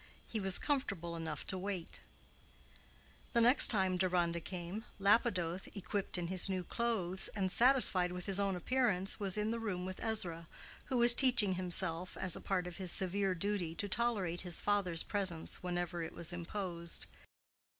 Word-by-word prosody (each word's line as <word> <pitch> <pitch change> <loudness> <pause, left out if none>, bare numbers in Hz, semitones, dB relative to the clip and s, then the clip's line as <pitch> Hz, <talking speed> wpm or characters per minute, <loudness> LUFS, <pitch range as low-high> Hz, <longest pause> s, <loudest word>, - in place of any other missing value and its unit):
He 225 - -6
was 190 -2 +3
comfortable 195 - -3
enough 160 -2 -7
to 190 - -4
wait. 190 -3 -6 1.3
The 235 - +2
next 245 +4 +8
time 190 -4 +4
Deronda 175 -2 -1
came, 180 +4 -8
Lapidoth, 195 -4 0
equipped 200 0 -3
in 175 - -4
his 185 +2 0
new 185 -1 -3
clothes, 190 -4 -2
and 190 -3 -2
satisfied 225 -7 +5
with 180 0 -7
his 195 -1 -2
own 200 -1 -1
appearance, 195 -1 -1
was 195 -1 -2
in 210 +1 -2
the 230 - -4
room 185 -5 -5
with 185 0 -8
Ezra, 175 -7 -2 0.4
who 260 - -3
was 240 0 +10
teaching 240 -7 +7
himself, 180 -1 -2
as 185 -2 0
a - - -9
part 185 -2 -3
of 180 -1 -9
his 185 -3 -3
severe 190 0 +1
duty, 180 -3 -4
to 205 - -4
tolerate 200 -5 -2
his 175 -3 -1
father's 195 -5 -1
presence 190 -6 -4
whenever 175 -1 -5
it 165 - -7
was 170 +1 -4
imposed. 175 -1 -5
185 Hz, 165 wpm, -33 LUFS, 175-205 Hz, 1.3 s, was